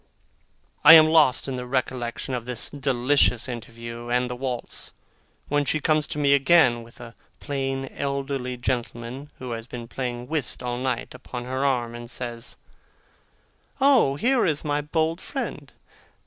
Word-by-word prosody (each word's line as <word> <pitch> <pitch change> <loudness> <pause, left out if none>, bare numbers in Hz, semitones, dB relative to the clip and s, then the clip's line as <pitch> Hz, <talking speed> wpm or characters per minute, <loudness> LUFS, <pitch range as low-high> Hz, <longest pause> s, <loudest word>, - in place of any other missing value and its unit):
I 155 - +11
am 155 -1 +9
lost 155 -6 +4
in 130 -1 -3
the 125 0 -5
recollection 130 0 -2
of 120 -2 -3
this 125 -2 -4
delicious 130 -3 +2
interview, 115 -1 -7
and 125 0 +1
the - - -3
waltz, 125 -1 -4 0.5
when 145 0 +1
she 150 +3 0
comes 155 0 +1
to - - -5
me 140 -1 +4
again, 140 -4 +5
with 115 +2 -16
a 120 -1 -10 0.3
plain 135 -1 -2
elderly 140 -2 -3
gentleman 120 +2 -4
who 125 -1 -7
has 115 0 -5
been 120 -2 -7
playing 125 -1 -4
whist 145 -4 -2
all 120 0 -2
night, 130 -2 -2
upon 125 -1 -7
her 130 +2 -2
arm, 125 -4 0
and 120 0 -8
says: 120 -1 -5 1.2
'Oh! 265 - +4
here 245 - +2
is 155 -3 0
my 145 0 0
bold 160 +3 -1
friend! 270 -2 -5
130 Hz, 155 wpm, -25 LUFS, 120-145 Hz, 1.2 s, I